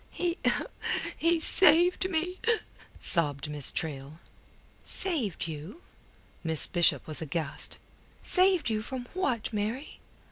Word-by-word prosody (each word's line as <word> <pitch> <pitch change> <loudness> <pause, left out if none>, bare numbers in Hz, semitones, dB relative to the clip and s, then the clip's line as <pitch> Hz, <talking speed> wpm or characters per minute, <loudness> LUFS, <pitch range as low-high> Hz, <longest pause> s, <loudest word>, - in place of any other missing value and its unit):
"He... 345 -1 -3 0.8
he 335 0 +1
saved 355 +3 +6
me," 360 +2 -3 0.6
sobbed 150 -3 +2
Miss 145 -3 -1
Traill. 145 -2 -5 0.6
"Saved 260 - 0
you?" 160 - -9 0.6
Miss 160 -2 0
Bishop 175 -2 +1
was 155 0 -2
aghast. 155 -1 -5 0.4
"Saved 370 -3 +3
you 215 -1 -1
from 250 +2 -7
what, 255 - -2
Mary?" 220 +7 -4
220 Hz, 105 wpm, -28 LUFS, -, 0.8 s, saved